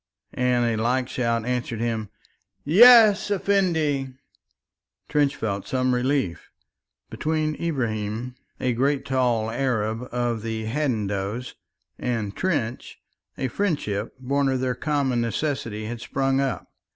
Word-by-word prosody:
and 125 -1 +1
a 115 -2 0
like 125 +2 +1
shout 115 -3 -1
answered 125 -2 -2
him, 110 -3 -2 0.5
"Yes, 215 - +7
Effendi." 170 -9 +1 1.0
Trench 145 -2 +2
felt 100 -3 -3
some 130 -1 +1
relief. 125 -7 -1 0.6
Between 155 0 -1
Ibrahim, 120 -6 -2 0.3
a 125 -1 0
great 135 +3 0
tall 120 -4 +1
Arab 115 -2 -1
of 120 -2 -1
the 110 0 -4
Hadendoas, 110 -3 -2 0.5
and 115 -5 -2
Trench, 130 -10 -2 0.4
a 130 - -1
friendship 145 - -2
born 135 +2 0
of 130 -1 0
their 130 0 0
common 135 -2 0
necessities 115 -3 -2
had 120 0 -6
sprung 135 +1 0
up. 135 -4 -3
125 Hz, 115 wpm, -24 LUFS, 115-140 Hz, 1.0 s, Yes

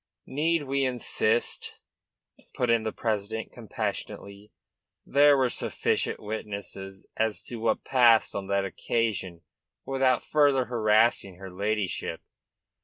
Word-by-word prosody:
"Need 160 +3 0
we 140 0 0
insist?" 120 -2 0 0.8
put 125 -2 +1
in 115 -1 +3
the 110 0 -2
president 110 0 -3
compassionately. 105 -2 -6 0.5
"There 145 0 +5
are 130 - +3
sufficient - - -1
witnesses 100 -2 -7
as 110 -1 0
to 120 - -7
what 110 0 0
passed 120 -4 +4
on 100 -1 -4
that 100 0 +1
occasion 95 -4 -2 0.4
without 135 -1 +2
further 145 -4 +3
harassing 110 -4 +2
her 95 +1 -10
ladyship." 100 0 -2
110 Hz, 110 wpm, -27 LUFS, 100-130 Hz, 0.8 s, There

